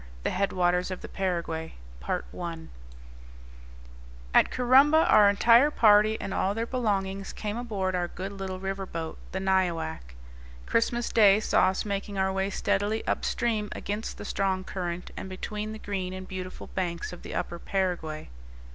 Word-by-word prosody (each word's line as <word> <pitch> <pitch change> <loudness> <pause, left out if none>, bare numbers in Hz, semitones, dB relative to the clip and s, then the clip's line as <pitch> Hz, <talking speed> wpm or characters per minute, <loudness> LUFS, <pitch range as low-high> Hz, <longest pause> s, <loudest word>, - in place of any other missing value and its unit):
IV. - - -18
THE - - +1
HEADWATERS 180 -2 +1
OF 185 - -5
THE - - -7
PARAGUAY 170 -4 -3 2.6
At - - +6
Corumba 275 +6 +5
our 205 -1 +7
entire 235 +7 +6
party, 215 -4 +5
and 195 - -4
all 195 +2 0
their 225 +1 -1
belongings, 195 -6 -1
came 210 0 -4
aboard 205 -6 -2
our 175 -1 0
good 190 +3 -6
little 190 -2 -5
river 195 0 -4
boat, 165 -2 -5
the 190 - -2
Nyoac. 170 - -1 0.5
Christmas 235 +1 +1
Day 205 -2 +6
saw 215 - +3
us 190 +2 -1
making 200 0 -3
our 190 0 +1
way 190 +1 0
steadily 205 +2 0
up - - -1
stream 215 -3 0
against 210 +2 -4
the - - -8
strong 190 -1 0
current, 180 -2 -5
and 190 - -6
between 210 +3 -5
the 220 - -6
green 190 -3 -4
and 185 0 -7
beautiful 185 -1 -6
banks 175 -2 -3
of 180 - -10
the - - -7
upper 170 - -3
Paraguay. 175 -6 -2
195 Hz, 155 wpm, -28 LUFS, 185-210 Hz, 2.6 s, our